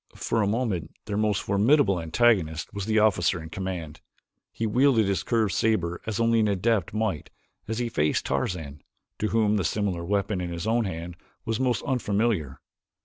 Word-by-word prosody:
For 115 Hz, -, -1 dB
a 100 Hz, -, +1 dB
moment 105 Hz, -6 st, -2 dB
their 105 Hz, -, -3 dB
most 105 Hz, -1 st, +1 dB
formidable 100 Hz, -, +3 dB
antagonist 80 Hz, -2 st, +1 dB
was 100 Hz, -1 st, -4 dB
the 110 Hz, 0 st, +1 dB
officer 95 Hz, -5 st, +3 dB
in 80 Hz, 0 st, -9 dB
command. 90 Hz, -4 st, -5 dB, 0.5 s
He 115 Hz, -, -3 dB
wielded 120 Hz, 0 st, +3 dB
his 100 Hz, -1 st, 0 dB
curved 110 Hz, -6 st, 0 dB
saber 90 Hz, -4 st, 0 dB
as 110 Hz, -1 st, -2 dB
only 115 Hz, 0 st, +3 dB
an 110 Hz, -, +3 dB
adept 100 Hz, -1 st, +1 dB
might 105 Hz, -7 st, -2 dB, 0.4 s
as 110 Hz, 0 st, -3 dB
he 120 Hz, 0 st, -1 dB
faced 75 Hz, -9 st, 0 dB
Tarzan, 70 Hz, +1 st, -3 dB, 0.4 s
to 110 Hz, -, 0 dB
whom 105 Hz, -1 st, +2 dB
the 100 Hz, -, 0 dB
similar 95 Hz, 0 st, -1 dB
weapon 100 Hz, +1 st, -1 dB
in 90 Hz, -, -3 dB
his 85 Hz, +1 st, -5 dB
own 115 Hz, +1 st, +1 dB
hand 85 Hz, -1 st, -6 dB, 0.3 s
was 115 Hz, 0 st, -1 dB
most 130 Hz, -2 st, 0 dB
unfamiliar. 105 Hz, -, 0 dB
100 Hz, 175 wpm, -26 LUFS, 85-110 Hz, 0.5 s, formidable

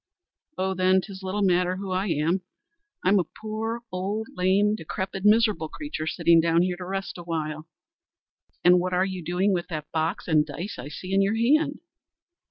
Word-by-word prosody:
"Oh, 190 Hz, 0 st, 0 dB
then, 185 Hz, 0 st, +3 dB
'tis 190 Hz, 0 st, -8 dB
little 190 Hz, +2 st, -2 dB
matter 180 Hz, -1 st, +2 dB
who 190 Hz, 0 st, -5 dB
I 185 Hz, +2 st, 0 dB
am. 165 Hz, +3 st, +1 dB, 0.6 s
I'm 195 Hz, +2 st, +4 dB
a -, -, +2 dB, 0.2 s
poor, 220 Hz, +2 st, -3 dB
old, 200 Hz, +4 st, -2 dB
lame, 195 Hz, +3 st, +2 dB
decrepit, 190 Hz, 0 st, -4 dB
miserable 210 Hz, -6 st, +3 dB
creature, 290 Hz, -, -5 dB
sitting 170 Hz, 0 st, +4 dB
down 165 Hz, +1 st, +3 dB
here 180 Hz, 0 st, 0 dB
to 180 Hz, -, -7 dB
rest 195 Hz, -1 st, -4 dB
awhile." 155 Hz, -2 st, -4 dB, 1.0 s
"An' 180 Hz, +1 st, +6 dB
what 185 Hz, +1 st, -2 dB
are 180 Hz, +1 st, +3 dB
you 185 Hz, -2 st, -5 dB
doing 180 Hz, +4 st, +1 dB
with 175 Hz, -1 st, -2 dB
that 155 Hz, -3 st, -6 dB
box 160 Hz, +3 st, -1 dB
and 155 Hz, -3 st, +4 dB
dice 160 Hz, +5 st, -6 dB
I 125 Hz, -, -6 dB
see 185 Hz, +6 st, -6 dB
in 195 Hz, -, +4 dB
your 200 Hz, +3 st, +2 dB
hand?" 285 Hz, +6 st, +2 dB
185 Hz, 180 wpm, -26 LUFS, 170-200 Hz, 1.0 s, An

